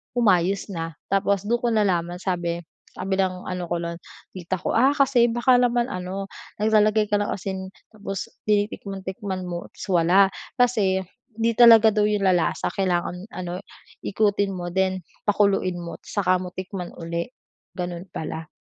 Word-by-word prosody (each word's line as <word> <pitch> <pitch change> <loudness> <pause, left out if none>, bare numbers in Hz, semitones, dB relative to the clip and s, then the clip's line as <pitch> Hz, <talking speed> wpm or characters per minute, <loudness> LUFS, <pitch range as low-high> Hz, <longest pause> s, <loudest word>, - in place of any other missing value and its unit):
umayos 200 -4 +2
na. 165 -3 -5 0.2
Tapos, 195 0 +2
dun 235 +3 0
ko 240 - -1
nalaman 175 -5 +1
sabi, 175 -2 -2 0.3
sabi 190 +1 -2
ng 185 -1 0
ano 180 -1 -4
ko 170 0 -2
nun, 170 0 -4 0.3
tita 185 0 -3
ko, - - -1
"Ah, 270 +4 +4
kasi 270 -4 +4
baka 240 +2 +3
naman, 245 +1 +2
ano, 185 +2 -5 0.3
naglalagay 215 0 +3
ka 205 - +3
ng 205 - -1
asin 190 -1 -5 0.2
tapos 200 -3 -5 0.2
tinitikman-tikman 195 -2 -2
mo 175 0 -5
ta's - - -7
wala", 180 +3 +5 0.3
kasi, 210 -7 +2 0.3
'di 230 +1 +1
talaga 225 -2 +9
daw 210 0 +2
yun 210 -1 0
lalasa 180 -3 +1
kailangan, 180 0 -1
ano, 180 0 -4 0.5
ikutin 205 -1 +1
mo 175 -1 -5
then 190 0 0 0.3
pakuluin 200 -3 +2
mo 170 - -7
tsaka 185 -3 +1
mo 180 - -5
tikman 185 -1 -6
ulit. 170 +6 -4 0.4
Gano'n 175 0 -5
pala. 160 0 -5
195 Hz, 150 wpm, -24 LUFS, 180-210 Hz, 0.5 s, talaga